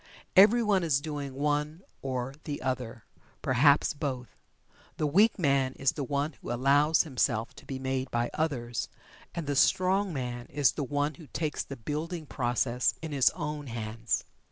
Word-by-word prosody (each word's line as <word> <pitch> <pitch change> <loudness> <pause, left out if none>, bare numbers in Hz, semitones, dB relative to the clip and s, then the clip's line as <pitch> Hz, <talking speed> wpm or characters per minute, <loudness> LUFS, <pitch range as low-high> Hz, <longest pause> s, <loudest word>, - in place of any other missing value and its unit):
Everyone 210 0 +6
is 155 -6 +2
doing 145 -3 -5
one 150 +4 -1 0.2
or 130 -1 -3
the 145 -1 -4
other 125 -3 -3 0.4
perhaps 140 +3 +4
both. 130 -6 -4 0.7
The 155 - 0
weak 200 +10 +4
man 140 -6 +2
is 135 0 +1
the 145 - -4
one 140 +3 -1
who - - -5
allows 140 +5 +4
himself 125 -6 0
to - - -14
be 135 - -4
made 130 0 -2
by 120 0 -1
others, 120 -7 -2 0.5
and 170 - -3
the 145 0 -1
strong 185 +6 +3
man 125 -4 -4
is 145 -1 +2
the 145 - -3
one 145 +2 -1
who 150 +2 -13
takes 155 -1 -2
the 140 - -8
building 155 +7 -4
process 125 -2 0
in 160 - -4
his 140 -3 +4
own 150 -1 -4
hands. 115 -1 -2
140 Hz, 160 wpm, -29 LUFS, 130-155 Hz, 0.7 s, Everyone